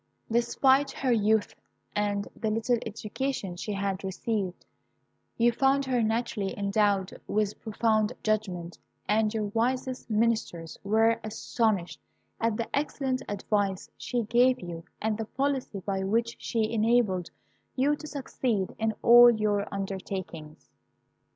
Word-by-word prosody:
Despite 265 +4 +3
her 260 -2 -1
youth 220 -2 +2 0.4
and 205 -1 0
the 220 - -2
little 225 +2 +1
education 220 -2 -3
she 200 +4 -5
had 195 -1 -2
received, 190 -1 -3 0.7
you 235 +1 +4
found 270 +3 +2
her 255 -2 +1
naturally 220 -3 -1
endowed 200 -1 +1
with 210 0 -1
profound 220 0 +1
judgment, 185 -6 -2 0.3
and 215 +1 +2
your 220 -1 -1
wisest 255 +2 -1
ministers 215 -7 0
were 225 +3 +3
astonished 215 -3 -1 0.4
at 225 -1 0
the 230 - -2
excellent 270 -2 -1
advice 200 -1 -1
she 245 -2 -2
gave 245 +4 +3
you, 170 -2 -7 0.2
and 220 0 -1
the 225 - -2
policy 265 -5 -2
by 195 0 -2
which 230 +4 0
she 220 -2 -1
enabled 215 -5 +2 0.5
you 280 +3 +2
to 305 - -9
succeed 250 -8 -2
in 220 -1 0
all 240 +1 +9
your 210 -3 0
undertakings." 190 -5 -6
220 Hz, 125 wpm, -28 LUFS, 200-235 Hz, 0.7 s, all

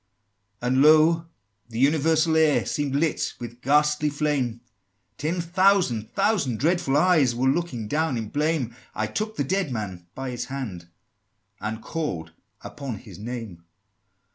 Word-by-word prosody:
XVII. 125 - -2
"And, 130 +2 +3
lo! 155 +2 +5 0.4
the 115 - -7
universal 160 +4 +3
air 155 -2 +4
Seemed 145 -2 -1
lit 155 +2 0
with 120 0 -8
ghastly 150 +2 +3
flame; 140 -6 -1 0.6
Ten 165 +5 -1
thousand 175 - +2
thousand 160 - +1
dreadful 165 -2 +2
eyes 150 -7 +4
Were 130 +2 +1
looking 135 -7 -1
down 150 0 0
in 110 -2 -4
blame: 145 -5 -1 0.2
I 110 - 0
took 215 - -3
the 145 - 0
dead 185 +1 -1
man 95 -7 -5
by 135 -1 -4
his 120 0 -4
hand, 120 -10 -6 0.7
And 110 +2 -4
called 90 - -4 0.3
upon 140 -5 -6
his - - -12
name!" 110 -6 -6
140 Hz, 140 wpm, -25 LUFS, 120-160 Hz, 0.7 s, lo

